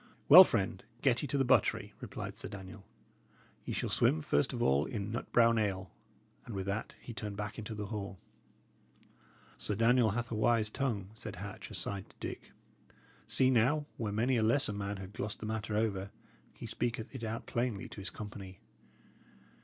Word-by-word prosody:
"Well, 175 +6 +13
friend, 95 - -1 0.2
get 125 -4 +3
ye 145 - -2
to 140 - 0
the 135 - +3
buttery," - - +3
replied - - -6
Sir - - -5
Daniel. 95 0 -10 0.8
"Ye - - -3
shall - - -2
swim 80 - +3
first - - +2
of - - -4
all 70 +3 +3
in 105 -2 -4
nut 115 - -4
brown 115 -1 +5
ale." 95 -3 -1 0.5
And 115 - -7
with 95 -1 -3
that 100 +3 -3
he 120 - -8
turned 105 -1 -5
back 105 +1 -4
into 110 0 -5
the 105 0 -4
hall. 100 -2 -5 1.4
"Sir 105 - -1
Daniel 115 +1 +4
hath 115 +3 -2
a - - -1
wise 110 0 +2
tongue," 105 -8 -2
said 110 - -7
Hatch, - - -7
aside, 100 -1 -4
to - - -21
Dick. - - -6 0.8
"See, 130 -1 +3
now, 130 +5 +3
where 110 -3 -2
many 120 +5 +2
a - - +2
lesser 110 0 +2
man 100 0 -3
had 95 +1 -8
glossed 105 - -4
the - - -6
matter 110 -1 -2
over, 100 -3 0 0.4
he - - -9
speaketh 120 -1 -3
it 130 -3 -6
out 110 +1 -3
plainly 120 -4 -2
to 100 - -8
his 95 - -3
company. 100 -3 -8
110 Hz, 185 wpm, -33 LUFS, 100-120 Hz, 1.4 s, Well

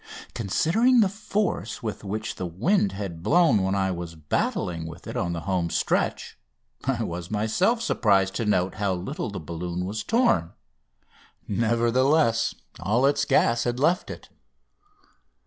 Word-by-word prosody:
Considering 220 - +2
the 205 - +4
force 200 - -2
with 105 -3 -4
which 110 +3 -3
the 90 - -4
wind 100 - +1
had 95 -4 -6
blown 155 - +4
when 95 +1 0
I 95 -1 +1
was 85 -2 -6
battling 80 +2 -2
with 85 +3 -10
it - - -6
on 85 -2 -1
the 85 - -4
home 90 -3 -1
stretch - - -1 0.5
I - - 0
was 85 0 -5
myself 145 - +1
surprised 95 - +2
to 115 - -1
note 95 -3 +1
how 100 -2 -1
little 100 +9 -4
the 100 - -5
balloon 85 +2 -4
was 105 +3 -4
torn. 225 - +2 0.9
Nevertheless, 115 +4 +2 0.2
all 115 +6 +1
its 145 +1 +2
gas 115 0 +3
had 120 0 -2
left 170 +6 +2
it. - - -9
105 Hz, 145 wpm, -25 LUFS, 90-135 Hz, 0.9 s, the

